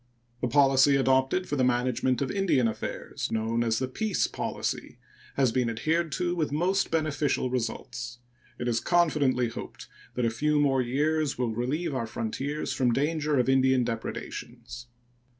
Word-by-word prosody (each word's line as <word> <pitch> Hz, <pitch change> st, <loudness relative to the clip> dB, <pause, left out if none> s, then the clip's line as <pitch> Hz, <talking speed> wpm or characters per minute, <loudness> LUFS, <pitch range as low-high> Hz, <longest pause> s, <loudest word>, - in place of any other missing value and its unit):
The 125 Hz, -, +1 dB
policy 135 Hz, +1 st, +5 dB
adopted 135 Hz, +6 st, +2 dB
for 145 Hz, -, -2 dB
the 130 Hz, -, +2 dB
management 125 Hz, +1 st, +1 dB
of 135 Hz, -, -3 dB
Indian 190 Hz, -12 st, +2 dB
affairs, 110 Hz, -, -4 dB
known 115 Hz, +1 st, 0 dB
as 115 Hz, -1 st, +1 dB
the 130 Hz, -, -1 dB
peace 205 Hz, +9 st, 0 dB
policy, -, -, -4 dB, 0.4 s
has 130 Hz, -4 st, +3 dB
been 125 Hz, -1 st, +1 dB
adhered 160 Hz, +8 st, 0 dB
to 175 Hz, +1 st, -1 dB
with 155 Hz, -4 st, -1 dB
most 185 Hz, +6 st, +1 dB
beneficial 150 Hz, -5 st, 0 dB
results. 120 Hz, 0 st, -4 dB, 0.4 s
It 120 Hz, -, -3 dB
is 115 Hz, -1 st, +1 dB
confidently 145 Hz, -8 st, +2 dB
hoped 115 Hz, -, -8 dB, 0.3 s
that 125 Hz, -, 0 dB
a 115 Hz, -, +1 dB
few 150 Hz, +6 st, +1 dB, 0.2 s
years 150 Hz, +4 st, 0 dB
more 125 Hz, -1 st, 0 dB
will -, -, -3 dB
relieve 140 Hz, +8 st, -1 dB
our 115 Hz, -4 st, -2 dB
frontiers 135 Hz, +7 st, -3 dB
from 125 Hz, -3 st, +2 dB
danger 150 Hz, +2 st, 0 dB
of 125 Hz, -, +2 dB
Indian 130 Hz, -1 st, +4 dB
depredations. 120 Hz, +1 st, -6 dB
130 Hz, 155 wpm, -27 LUFS, 120-150 Hz, 0.4 s, policy